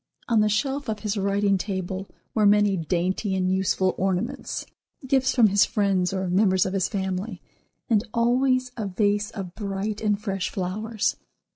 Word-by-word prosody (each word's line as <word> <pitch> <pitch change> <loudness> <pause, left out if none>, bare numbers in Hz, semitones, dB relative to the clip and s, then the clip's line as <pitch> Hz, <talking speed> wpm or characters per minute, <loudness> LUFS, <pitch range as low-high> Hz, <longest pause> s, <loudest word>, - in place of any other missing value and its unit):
On 230 -2 +3
the 210 - +3
shelf 270 +5 -1
of 215 -1 -3
his 210 -1 -2
writing 200 0 +1
table 190 0 -4 0.2
were 215 -2 +4
many 205 -1 +4
dainty 185 +4 -1
and 185 -1 +1
useful 190 0 +1
ornaments, 185 -1 -2 0.4
gifts 260 0 +2
from 230 -4 +6
his 200 +1 +5
friends 195 -3 +1
or 190 -1 -2
members 185 0 +3
of 190 - -2
his 190 -2 +1
family, 190 0 -3 0.5
and 220 -3 +3
always, 255 +2 +2
a 220 -4 -3
vase 205 +2 +1
of 195 -6 -7
bright 205 +1 -3
and 210 -2 +1
fresh 195 -3 -2
flowers. 210 +4 -2
200 Hz, 160 wpm, -25 LUFS, 190-215 Hz, 0.5 s, from